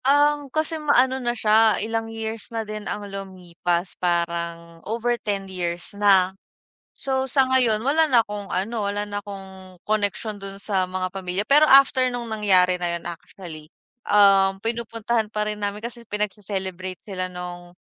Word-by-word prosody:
Ang 290 +1 +3
kasi 315 +3 -2
maano 265 -3 +3
na 240 -1 -1
siya, 220 0 +4
ilang 225 +1 -2
years 225 -1 -5
na 225 -1 -3
din 215 0 -6
ang 205 - -4
lumipas. 180 -2 -3
Parang 170 -1 -2
over 230 +5 -1
10 200 -2 -2
years 175 -2 -4
na. 195 -2 +4 0.6
So 265 -1 0
sa 265 0 +4
ngayon 240 -5 +3
wala 310 +3 +3
na 240 -4 +5
akong 205 -1 -6
ano, 215 +4 -1
wala 205 +1 -2
na 205 0 -4
akong 190 -2 -10
connection 210 0 -1
dun 195 0 -7
sa 195 -3 0
mga 185 0 -2
pamilya, 190 0 -3
pero 295 +2 +7
after 270 -1 +7
nung 240 -1 -4
nangyari 190 -4 +3
na 175 -1 0
yun - - -15
actually, 170 -2 -9 0.4
um, 195 -1 +5
pinupuntahan 230 -1 -2
pa 210 0 -2
rin 210 0 -5
namin. 205 +1 -3
Kasi 235 0 -6
pinagse-celebrate 190 -3 -4
sila 185 -3 -3
nung, 175 -1 -8
205 Hz, 160 wpm, -23 LUFS, 185-230 Hz, 0.6 s, pero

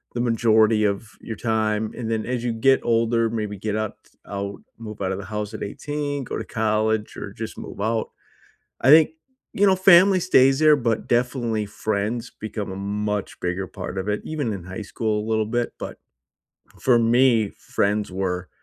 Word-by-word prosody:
the - - -1
majority 110 -2 +3
of 100 +2 -2
your 110 - -6
time. 110 -1 -1
And 115 -2 -4
then 110 -1 -1
as 125 -1 -2
you 120 - 0
get 135 +4 +4
older, 115 0 +2
maybe 105 -2 -3
get 105 +2 -3
up 110 -1 -3
t - - -28
out 100 0 -5 0.2
move 110 -2 -9
out 95 -1 -1
of 95 - -3
the 100 - -7
house 105 0 -4
at - - -5
18, 145 +4 -4
go - - -5
to - - -4
college, 110 0 0
or - - -6
just - - -7
move - - -8
out. 110 +1 0 0.7
I 130 - +4
think, 155 0 +8 0.4
you 205 - +3
know, 190 -1 +5
family 185 0 +6
stays 135 -7 +4
there, 155 -1 +6
but 115 -4 -1
definitely 120 -3 0
friends 110 +3 -2
become 110 -2 -5
a - - -6
much 105 +1 -3
bigger 90 +2 -2
part 95 - -7
of 95 +2 -3
it, 105 0 0
even 145 -8 -2
in 95 -4 -6
high 95 +4 -6
school 105 +1 -2
a - - -7
little 110 -1 +1
bit. 120 +1 -1
But - - -7 0.8
for 125 -2 +4
me, 115 -2 +4
friends 105 0 -1
were, 90 -1 -3
110 Hz, 190 wpm, -23 LUFS, 105-120 Hz, 0.8 s, think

